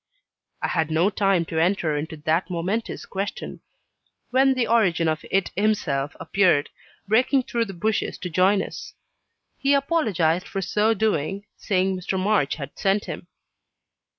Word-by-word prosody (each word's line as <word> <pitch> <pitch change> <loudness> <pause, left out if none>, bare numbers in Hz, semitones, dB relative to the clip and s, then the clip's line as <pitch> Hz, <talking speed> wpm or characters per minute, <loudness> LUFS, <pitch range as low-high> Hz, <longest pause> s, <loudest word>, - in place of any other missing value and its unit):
I - - +2
had 160 -2 0
no 165 +6 +2
time 195 -4 +2
to 160 0 -2
enter 170 -3 +1
into 160 +2 -4
that 160 +5 0
momentous 185 +6 -3
question, 195 +1 -5 0.7
when 265 +1 +4
the 250 -2 +1
origin 180 -8 +2
of 155 -1 -1
it 195 -1 +1
himself 175 -9 0
appeared, 175 -7 +2 0.4
breaking 255 +5 +3
through 235 -1 -1
the 195 -3 -8
bushes 215 +5 -1
to 180 - -5
join 190 +3 +3
us. - - -9 0.6
He 275 +1 +3
apologized 200 - +1
for 195 - -4
so 215 +4 +2
doing, 195 -1 -1
saying 190 -1 0
Mr. 185 +1 -3
March 195 -7 +1
had 140 -2 -8
sent 195 +1 +1
him. 170 0 -7
190 Hz, 150 wpm, -24 LUFS, 165-215 Hz, 0.7 s, when